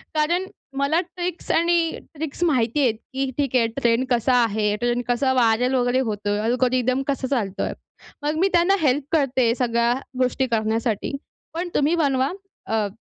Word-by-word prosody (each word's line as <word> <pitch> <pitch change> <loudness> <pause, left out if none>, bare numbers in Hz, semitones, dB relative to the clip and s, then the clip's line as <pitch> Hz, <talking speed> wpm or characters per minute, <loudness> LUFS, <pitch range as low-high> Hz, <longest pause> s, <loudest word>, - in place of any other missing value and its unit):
कारण 340 +5 +1 0.3
मला 280 +4 +2
ट्रिक्स 355 -1 -5
आणि 335 -1 +2 0.2
ट्रिक्स 310 +2 -4
माहिती 255 -3 +1
आहेत 240 -5 +2 0.2
की 270 0 -1
ठीक 275 -3 -1
आहे 235 -2 +4
ट्रेंड 240 -1 +2
कसा 245 +1 +2
आहे, 210 -2 0
ट्रेंड 240 0 0
कसा 260 +2 +1
व्हायरल 245 +1 +2
वगैरे 245 0 +2
होतोय 205 0 -2
अल्गोरिथम 255 +2 +1
कसा 275 -2 -1
चालतोय. 220 -8 -2 0.5
मग 300 +1 0
मी 380 - +4
त्यांना 350 +3 +4
हेल्प 285 -1 +2
करते, 260 -6 +2
सगळ्या 235 -1 +1 0.3
गोष्टी 255 +1 +1
करण्यासाठी 220 +2 -1 0.4
पण 350 +2 -3
तुम्ही 295 +4 +3
बनवा 275 -4 +1 0.3
अ, 220 -1 0
255 Hz, 150 wpm, -23 LUFS, 235-295 Hz, 0.5 s, आहे